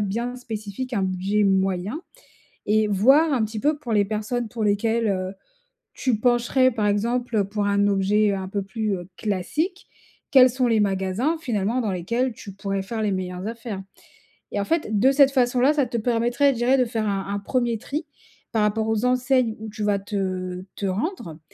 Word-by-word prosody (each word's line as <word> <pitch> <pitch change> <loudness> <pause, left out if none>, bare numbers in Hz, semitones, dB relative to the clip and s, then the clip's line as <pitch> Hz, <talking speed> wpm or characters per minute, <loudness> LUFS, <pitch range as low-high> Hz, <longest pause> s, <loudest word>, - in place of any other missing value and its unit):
bien 235 +5 -2
spécifiques 225 +1 -6
un 200 - 0
budget 190 +3 0
moyen 195 - 0 0.7
et 215 0 +3
voir 270 +10 +4
un 235 -4 +2
petit 215 0 -5
peu 300 +3 +1
pour 245 -5 -7
les 205 -1 +3
personnes 220 +3 -2
pour 235 -3 -4
lesquelles, 220 +2 +1
heu, 185 0 -2 0.6
tu 255 -4 0
pencherais 245 +2 +3
par 215 -2 0
exemple 230 +1 0
pour 205 +1 -2
un 200 0 +2
objet 200 +1 +2
un 190 -1 -4
peu 200 0 -2
plus, 210 +1 -2
heu, 175 +1 -8
classique. 300 - -2 0.4
Quels 255 -2 +8
sont 250 0 0
les 225 -2 +3
magasins 195 - 0
finalement 230 -1 0
dans 215 - -1
lesquels 235 +8 -1
tu 200 -2 -10
pourrais 195 0 -3
faire 220 +2 -4
les 210 - +1
meilleures 185 0 -4
affaires. 225 -4 -6 0.7
Et 205 - -2
en 200 - -1
fait, 220 -10 0
de 265 +5 +5
cette 275 0 +6
façon 250 -2 +2
là, 275 +4 +5
ça 285 -3 +2
te 235 - -7
permettrait, 240 +4 +2
je - - -8
dirais, 250 +3 +3
de 255 - +4
faire 225 -2 -2
un 195 -1 -2
un 200 - -1
1er 240 +1 0
tri 300 +8 -4 0.5
par 220 -2 +2
rapport 215 +1 +1
aux 220 +2 0
enseignes 250 -2 +2
où 220 - -7
tu 210 0 -6
vas 205 -1 +1
te 185 -2 -3
te 200 - -3
rendre. 190 - -3
215 Hz, 190 wpm, -24 LUFS, 200-245 Hz, 0.7 s, Quels